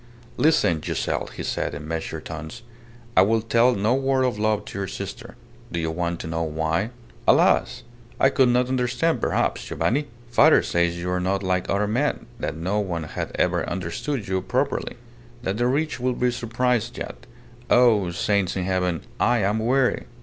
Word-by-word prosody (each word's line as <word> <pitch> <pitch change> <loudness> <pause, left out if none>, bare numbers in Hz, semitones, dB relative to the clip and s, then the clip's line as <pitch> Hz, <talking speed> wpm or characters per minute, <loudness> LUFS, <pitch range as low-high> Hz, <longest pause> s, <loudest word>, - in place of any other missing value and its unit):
"Listen, 125 - +3
Giselle," - - -2
he - - -7
said, - - -2
in 75 +2 -7
measured 80 -1 -4
tones; 80 +9 -7 0.5
"I - - +7
will 110 +3 +2
tell 120 +2 +3
no 105 +4 +2
word 135 0 +1
of 125 -5 0
love 105 -1 +1
to 100 - -6
your 100 - -2
sister. - - -7 0.4
Do 85 - -2
you 80 -1 -1
want 85 +1 -2
to - - -6
know 80 0 -2
why?" 80 +5 -1 0.4
"Alas! - - +3 0.4
I 135 - +5
could 130 -2 +3
not 125 +1 +3
understand 130 +5 0
perhaps, - - 0
Giovanni. 145 +5 0 0.2
Father 120 - +5
says 85 0 +1
you 90 +1 -3
are 90 - 0
not 95 +2 -1
like 90 -1 0
other 100 +1 +1
men; 125 +8 0
that - - -3
no 95 +6 -1
one 90 -5 -2
had 80 - -5
ever - - +1
understood 95 - -3
you 95 0 0
properly; 130 +8 -1 0.5
that 95 0 -1
the 120 +1 +2
rich 145 +2 0
will 125 +1 0
be 125 0 +1
surprised 120 0 -1
yet.... - - -7 0.4
Oh! 115 -7 +5
saints 100 +2 0
in 95 - -1
heaven! 90 -3 0 0.2
I 120 -2 +3
am 105 +3 +1
weary." 125 +3 +1
105 Hz, 180 wpm, -24 LUFS, 85-125 Hz, 0.5 s, I